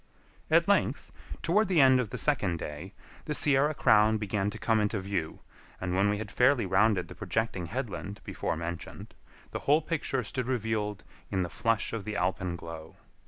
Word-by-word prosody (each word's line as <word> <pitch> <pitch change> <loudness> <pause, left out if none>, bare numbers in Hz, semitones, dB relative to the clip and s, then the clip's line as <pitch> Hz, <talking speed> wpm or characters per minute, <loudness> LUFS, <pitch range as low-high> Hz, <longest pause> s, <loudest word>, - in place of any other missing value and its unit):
At - - +4
length, - - +1 0.3
toward 200 +6 +3
the 180 -4 +2
end 130 -2 +6
of 120 -5 -1
the - - -5
second 105 - +1
day, 80 +5 -7 0.3
the 150 - -1
Sierra 145 +1 +3
Crown 110 -2 +4
began 105 -1 -1
to - - -7
come 115 -1 +1
into 105 0 0
view, 95 -5 -3 0.4
and 90 -1 -3
when 100 +2 +3
we 105 - 0
had 105 0 -6
fairly 125 -2 +3
rounded 95 0 +2
the - - -9
projecting 110 -6 -2
headland 105 -2 -5
before - - -3
mentioned, 85 +1 -6 0.4
the - - -3
whole 150 +2 +5
picture 150 -5 -1
stood 125 +2 -3
revealed 110 -4 -2 0.3
in 95 -2 0
the 90 - -4
flush 115 +5 0
of 115 -3 -3
the 105 0 -5
alpenglow. 85 -4 -3
105 Hz, 175 wpm, -29 LUFS, 95-125 Hz, 0.4 s, end